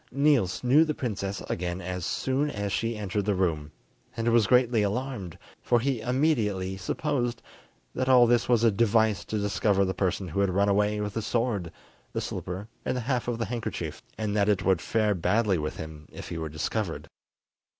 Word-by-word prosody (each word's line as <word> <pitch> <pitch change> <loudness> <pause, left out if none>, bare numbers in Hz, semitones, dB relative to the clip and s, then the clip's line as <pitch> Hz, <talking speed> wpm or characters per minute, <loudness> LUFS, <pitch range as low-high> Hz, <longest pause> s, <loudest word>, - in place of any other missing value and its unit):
Niels 140 -10 +2
knew 135 +6 +6
the 155 -2 -2
princess 100 -5 -3
again 90 +1 -3
as 90 -1 -4
soon 135 +3 0
as 100 -6 -3
she 115 +1 -1
entered 100 -1 -2
the 105 -2 +1
room, 80 -5 -1 0.5
and 115 0 -1
was 115 -3 +4
greatly 125 -3 +4
alarmed, 105 -4 -3 0.2
for 120 - +2
he 130 0 0
immediately 110 -8 0
supposed 120 +4 -2 0.5
that 130 - -1
all 125 -2 +7
this 120 0 +2
was 120 -2 +4
a 115 - +5
device 110 0 +2
to 110 - -3
discover 100 -1 +1
the 95 - -1
person 95 0 -1
who 80 - -2
had 100 -1 +3
run 100 +2 +2
away 105 +1 +2
with 105 -1 -3
the 115 - -2
sword, 110 -6 -1 0.4
the - - -1
slipper 95 +4 -5 0.2
and 130 - -1
the - - -2
half 125 0 -1
of 120 -1 -1
the 115 - -1
handkerchief, 115 +1 -4 0.2
and 105 -1 -2
that 105 0 +3
it 100 -3 +1
would 95 -4 +3
fare 105 +3 +1
badly 95 +1 +1
with 75 0 -4
him 80 -2 -8
if - - -9
he 85 - -4
were 80 -1 -4
discovered. 80 +5 -3
105 Hz, 190 wpm, -27 LUFS, 95-120 Hz, 0.5 s, all